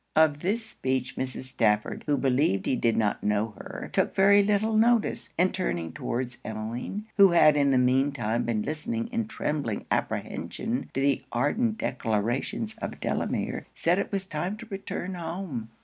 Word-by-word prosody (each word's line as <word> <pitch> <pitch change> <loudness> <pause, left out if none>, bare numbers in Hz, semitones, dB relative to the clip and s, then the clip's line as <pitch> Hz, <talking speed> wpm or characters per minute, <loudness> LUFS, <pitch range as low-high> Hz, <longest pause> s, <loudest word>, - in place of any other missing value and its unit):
Of 155 -2 +4
this 210 +7 -1
speech, 130 - -2
Mrs. 130 0 -3
Stafford, 110 -5 0
who 145 -1 +2
believed 125 -8 +2
he - - +2
did 115 -2 +1
not 105 -2 0
know 105 +1 0
her, - - -7
took - - +1
very 200 +1 +6
little 210 +2 +1
notice; 230 0 +2
and 180 +2 +3
turning 85 - -2
towards 120 0 -3
Emmeline, 115 - -4
who 195 -3 +7
had 155 -3 +6
in 140 -1 +3
the 135 - +4
mean 130 +3 +3
time 115 -2 -1
been 110 -3 0
listening 230 - -3
in 230 -3 -2
trembling 145 - -2
apprehension - - -2
to 135 - +1
the 140 -1 +2
ardent 215 - +1
declarations 125 - -1
of - - -5
Delamere, - - -2
said 175 +3 +2
it - - -2
was 195 -1 -1
time 180 +4 -3
to 230 - -9
return 190 -1 -4
home. 165 - -5
145 Hz, 165 wpm, -27 LUFS, 120-195 Hz, -, who